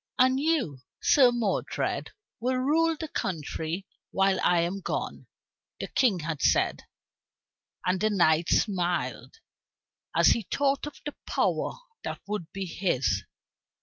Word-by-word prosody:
"And 260 +1 +4
you, 285 - 0 0.2
Sir 255 -4 +6
Modred, 230 -5 -1 0.3
will 255 +2 0
rule 315 +5 +2
the 315 - -3
country 165 - -3 0.2
while 195 -1 +2
I 175 -1 +4
am 175 +4 -1
gone," - - -4 0.5
the - - -4
King 210 -10 +2
had 155 -2 -4
said. - - +2 1.0
And 180 +1 +1
the 215 - +3
knight 170 -4 +3
smiled 180 - 0 0.8
as - - +6
he 220 -5 +1
thought 280 +1 +1
of 295 - -9
the 295 - -4
power - - 0 0.3
that - - -4
would 200 -5 -4
be 195 0 -4
his. 175 -7 0
195 Hz, 130 wpm, -28 LUFS, 175-260 Hz, 1.0 s, Sir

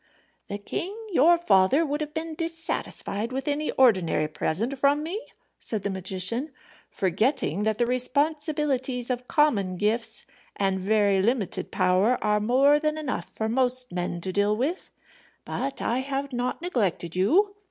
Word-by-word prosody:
"The 200 - -4
king, 360 - -5
your 340 +1 +5
father, 260 - +3
would 295 +1 -2
have 300 -1 -4
been 320 0 -3
dissatisfied 325 - -3
with 265 +2 -4
any 295 +1 -1
ordinary 185 -11 +3
present 190 - -2
from 285 +2 +3
me," 365 +8 -4 0.4
said 215 -4 -3
the 200 - -1
magician, 190 - -2 0.4
"forgetting 200 - 0
that 220 -1 +1
the 240 - +2
responsibilities 265 -1 0
of 250 0 -4
common 215 - +2
gifts, 225 +3 0 0.3
and 195 -1 0
very 200 0 +2
limited 220 -2 -1
power, 190 +7 +2
are 210 0 +2
more 265 +7 +4
than 305 0 -1
enough 300 -4 -3
for 220 - -3
most 250 +1 +1
men 175 -1 -3
to 185 +1 -3
deal 205 +2 +2
with. 300 +10 -2 0.6
But 275 - -4
I 240 +2 0
have 275 +1 -3
not 250 +6 -2
neglected 195 - -1
you. 355 - +3
250 Hz, 150 wpm, -26 LUFS, 200-290 Hz, 0.6 s, your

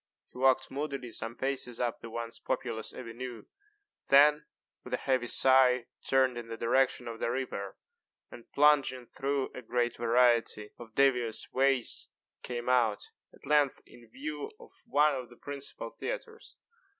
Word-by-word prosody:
He - - -14
walked 130 0 +3
moodily 140 -3 -4
some 115 +1 -5
paces 130 -3 -3
up 120 -2 -1
the 115 - -9
once 115 0 -5
populous 120 -4 -3
avenue, 120 0 -8 0.6
then, 150 +2 +6 0.4
with - - -2
a - - -9
heavy 130 -2 +1
sigh, 130 -1 +4 0.2
turned 130 -2 +2
in 115 - -8
the 115 0 -6
direction 125 +1 +1
of 115 -1 -6
the - - -1
river, 120 -6 -4 0.5
and, 120 - -13
plunging 140 -4 +3
through 135 +2 -2
a - - -7
great 120 0 -1
variety 115 -2 +2
of 115 -2 -12
devious 125 -5 +1
ways, 135 -2 +1 0.3
came 120 -1 -5
out, 120 -5 +1 0.2
at - - -17
length, 145 -1 +2
in 120 -2 -17
view 150 +4 -5
of - - -15 0.2
one 150 +2 +4
of 130 -3 -5
the 120 - -16
principal 140 -5 -6
theatres. 460 -2 -7
125 Hz, 150 wpm, -30 LUFS, 115-135 Hz, 0.6 s, then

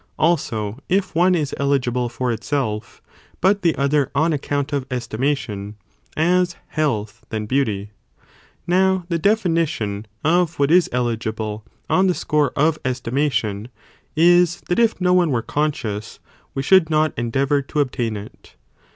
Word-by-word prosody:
Also, 115 -9 0
if 190 +1 +1
one 180 +2 +4
is 150 -5 -1
eligible 125 -3 0
for 125 +1 -2
itself, 115 -2 -3 0.4
but 195 +2 +3
the 165 -3 +2
other 140 0 +1
on 160 +3 +2
account 145 0 -2
of 140 -2 0
estimation, 115 -4 -2 0.4
as 175 +2 +2
health 115 -8 -2
than 110 -1 -3
beauty. 105 -5 -1 0.7
Now, 185 +1 +2
the 170 -1 0
definition 165 - 0 0.2
of 175 +2 +2
what 140 +1 +2
is 180 0 +5
eligible 110 -3 -2 0.2
on 190 +1 +3
the 180 - +2
score 150 -2 +1
of 155 +2 +2
estimation, 120 -5 -1 0.5
is 175 +2 +4
that 175 - +1
if 230 -3 +2
no 180 -1 +3
one 180 -2 +4
were 120 -5 0
conscious, 120 -8 -2 0.4
we 135 - -1
should 185 +1 +5
not 155 0 +2
endeavour 135 +4 0
to 140 +2 -4
obtain 120 -6 -1
it.! 100 +1 -12
140 Hz, 140 wpm, -21 LUFS, 115-170 Hz, 0.7 s, is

